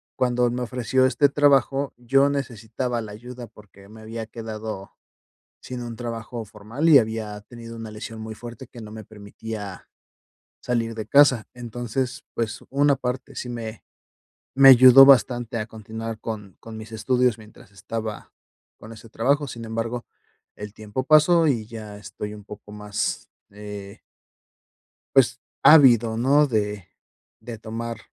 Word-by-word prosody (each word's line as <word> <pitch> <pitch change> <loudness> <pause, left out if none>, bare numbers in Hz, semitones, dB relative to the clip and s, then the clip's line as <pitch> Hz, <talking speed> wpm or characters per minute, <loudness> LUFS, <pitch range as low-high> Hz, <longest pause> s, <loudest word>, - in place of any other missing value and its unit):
cuando 125 -1 +1
me 125 +1 -3
ofreció 125 +1 +1
este 145 +2 +3
trabajo, 140 -1 +2
yo 135 +3 +3
necesitaba 120 -2 -3
la 105 -2 -8
ayuda 120 +2 -9
porque 100 -2 -18
me 110 +1 -13
había 110 0 -7
quedado, 110 -3 -7 0.7
sin 125 -1 -7
un 120 -1 -7
trabajo 115 0 -6
formal, 110 +10 -3
y 150 -4 +9
había 110 -2 -2
tenido 115 +1 -11
una 115 -1 -7
lesión 110 +1 -8
muy 110 0 -7
fuerte 120 +2 -10
que 120 - -12
no 110 -1 -9
me 110 0 -9
permitía, 105 -1 -9 0.7
salir 115 -2 -2
de 110 - -5
casa. 140 -6 +5
Entonces, 120 +1 -4
pues, 115 -1 -3
una 140 +1 +3
parte 125 0 -5
sí 125 - -5
me 115 -2 -7 0.7
me 135 0 +9
ayudó 130 +1 +10
bastante 120 -3 +4
a 110 - -3
continuar 110 0 -7
con 105 -4 -7
con 115 -1 -10
mis 110 0 -9
estudios 125 +1 +1
mientras 105 -3 -16
estaba 105 +2 -6 0.5
con 110 - -11
ese 115 +1 -13
trabajo. 140 +7 0
Sin 115 -3 -8
embargo, 115 +2 -4 0.5
el 105 0 -9
tiempo 110 +4 -5
pasó 155 +3 +5
y 120 -7 +1
ya 110 -2 -9
estoy 105 0 -7
un 105 - -11
poco 105 0 -12
más, 105 0 -4 0.2
eh 105 0 -9 1.2
Pues 125 -2 +4 0.2
ávido, 120 -7 +6
¿no?, 140 +5 +4
de 105 -6 -2 0.5
de 115 -2 -8
tomar 115 +1 -6
115 Hz, 145 wpm, -23 LUFS, 110-125 Hz, 1.2 s, ayudó